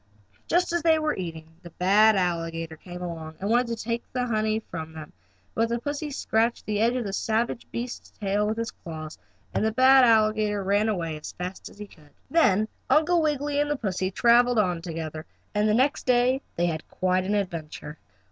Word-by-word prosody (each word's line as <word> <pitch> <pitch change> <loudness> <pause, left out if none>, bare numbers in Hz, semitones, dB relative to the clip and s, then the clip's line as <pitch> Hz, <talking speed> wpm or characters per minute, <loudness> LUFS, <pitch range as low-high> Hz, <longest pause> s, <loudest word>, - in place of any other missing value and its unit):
Just 350 0 +1
as 345 - +1
they 320 0 +4
were 310 -1 0
eating 165 -3 -5
it 160 +1 -26
the 175 - -11
bad 205 +6 +4
alligator 165 -3 -2
came 180 +2 -9
along, 160 -2 -6
and 200 +3 -2
wanted 240 +1 +3
to 230 - -2
take 230 +1 -3
the 250 -1 0
honey 215 -2 0
away 220 - -4
from 160 -1 -6
them, 155 -2 -10 0.4
but 230 +1 +1
the 235 - 0
pussy 290 +4 -4
scratched 230 -4 0
the 210 -1 -1
end 235 +3 +2
of 250 - -1
the 200 -2 -5
savage 225 +3 -1
beast's 240 +1 -5
tail 205 0 0
with 215 +1 -2
his 230 0 -3
claws, 155 -2 -9 0.3
and - - 0
the 220 - +2
bad 260 +3 +6
alligator 215 -3 +3
ran 205 +3 +2
away 165 -6 -2
as 150 - -8
fast 180 +1 -6
as - - -17
he 210 - -7
could. 155 -7 -20 0.2
Then 215 - +4 0.2
Uncle 330 +3 +4
Wiggily 290 -1 0
and 295 - -1
the 295 - +1
pussy 190 -6 -2
traveled 240 +4 +4
on 180 -5 +1
together 160 -2 -5 0.3
and 210 0 +2
the 210 - +3
next 265 +4 +1
day 250 +2 +3
they 175 - +1
had 160 -2 -3
quite 185 0 0
an 200 +3 0
adventure. 160 -5 -4
210 Hz, 205 wpm, -26 LUFS, 175-240 Hz, 0.4 s, bad